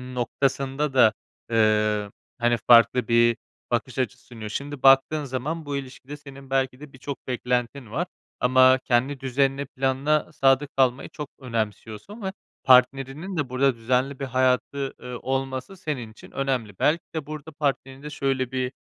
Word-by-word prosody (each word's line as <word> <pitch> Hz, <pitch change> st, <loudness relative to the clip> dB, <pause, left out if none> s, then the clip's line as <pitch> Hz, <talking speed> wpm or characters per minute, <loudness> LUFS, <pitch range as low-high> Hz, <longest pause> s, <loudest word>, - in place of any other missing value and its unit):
noktasında 135 Hz, +3 st, -1 dB
da, 115 Hz, -4 st, +6 dB, 0.4 s
eee, 105 Hz, -2 st, +2 dB, 0.3 s
hani, 120 Hz, 0 st, +2 dB
farklı 120 Hz, +1 st, +6 dB
bir 120 Hz, 0 st, +4 dB, 0.3 s
bakış 120 Hz, +1 st, -1 dB
açısı 125 Hz, 0 st, -3 dB
sunuyor. 110 Hz, -3 st, -8 dB
Şimdi, 140 Hz, +3 st, -5 dB
baktığın 135 Hz, +3 st, +5 dB
zaman 145 Hz, +5 st, -4 dB
bu 145 Hz, -1 st, -2 dB
ilişkide 135 Hz, +1 st, -8 dB
senin 140 Hz, -2 st, -13 dB
belki 130 Hz, -1 st, 0 dB
de 150 Hz, -1 st, -12 dB
birçok 135 Hz, +2 st, -8 dB
beklentin 125 Hz, -1 st, -2 dB
var. 170 Hz, +8 st, -1 dB, 0.3 s
Ama 130 Hz, +1 st, +5 dB
kendi 130 Hz, +3 st, +1 dB
düzenine, 135 Hz, +1 st, 0 dB
planına 135 Hz, +4 st, 0 dB
sadık 135 Hz, 0 st, +3 dB
kalmayı 130 Hz, 0 st, +2 dB
çok 150 Hz, -2 st, -7 dB
önemsiyorsun 115 Hz, -, -5 dB
ve 190 Hz, -1 st, -3 dB, 0.3 s
partnerinin 135 Hz, +7 st, +3 dB
de 140 Hz, -4 st, -1 dB
burada 130 Hz, 0 st, +2 dB
düzenli 125 Hz, +4 st, 0 dB
bir 135 Hz, -, -2 dB
hayatı, 130 Hz, +1 st, 0 dB
ııı, 125 Hz, -1 st, -6 dB
olması 135 Hz, +6 st, -3 dB
senin 130 Hz, -10 st, -4 dB
için -, -, -15 dB
önemli. 125 Hz, -8 st, -2 dB
Belki 160 Hz, +3 st, +2 dB
de, 155 Hz, -3 st, -3 dB
burada 155 Hz, +1 st, -8 dB
partnerinde 140 Hz, -1 st, -3 dB
şöyle 135 Hz, -3 st, -1 dB
bir 130 Hz, -1 st, -2 dB
130 Hz, 145 wpm, -25 LUFS, 125-140 Hz, 0.4 s, da